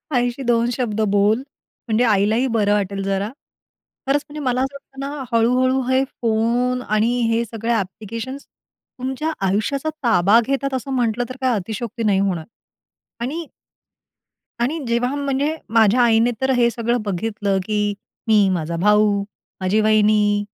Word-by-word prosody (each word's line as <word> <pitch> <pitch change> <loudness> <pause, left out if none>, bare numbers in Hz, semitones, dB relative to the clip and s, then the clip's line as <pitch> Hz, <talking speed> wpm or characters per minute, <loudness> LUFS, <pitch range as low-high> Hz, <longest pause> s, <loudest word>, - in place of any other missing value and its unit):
आईशी 245 +2 0
दोन 235 0 +2
शब्द 220 -4 -1
बोल 210 +5 +3 0.5
म्हणजे 225 +2 +2
आईलाही 220 +3 +2
बरं 205 -1 +3
वाटेल 200 -1 -1
जरा. 195 +2 -1 0.8
खरंच 285 +2 +2
म्हणजे 300 +1 -7
मला 250 0 +1
असं 270 +1 -2
वाटतं 270 -1 -13
ना, 275 +1 -4 0.2
हळूहळू 255 +3 +3
हे 260 +1 +3
फोन 240 +2 0
आणि 215 +3 +2 0.2
हे 230 +1 +1
सगळे 225 +1 -4
ॲप्लिकेशन्स 225 +6 -4
तुमच्या 265 +5 -6 0.2
आयुष्याचा 270 +10 0
ताबा 210 -1 +5
घेतात. 275 0 -1
असं 260 +1 -3
म्हटलं 240 -1 0
तर 255 - -6
काही 255 -2 +2
अतिशयोक्ती 225 +4 -4
नाही 200 -3 +3
होणार 180 -5 -1 0.8
आणि 315 +6 -3 1.2
आणि 280 +7 0
जेव्हा 235 +3 0
म्हणजे 285 +2 -1 0.2
माझ्या 225 +1 +4
आईने 230 0 +4
तर 265 0 +1
हे 240 -1 +4
सगळं 235 +1 -1
बघितलं, 200 0 -1
की 210 0 0 0.3
मी, 210 -3 +5
माझा 170 -1 -2
भाऊ, 210 +2 +3 0.4
माझी 190 +4 +2
वाहिनी, 210 -1 +3
230 Hz, 145 wpm, -21 LUFS, 210-255 Hz, 1.2 s, ताबा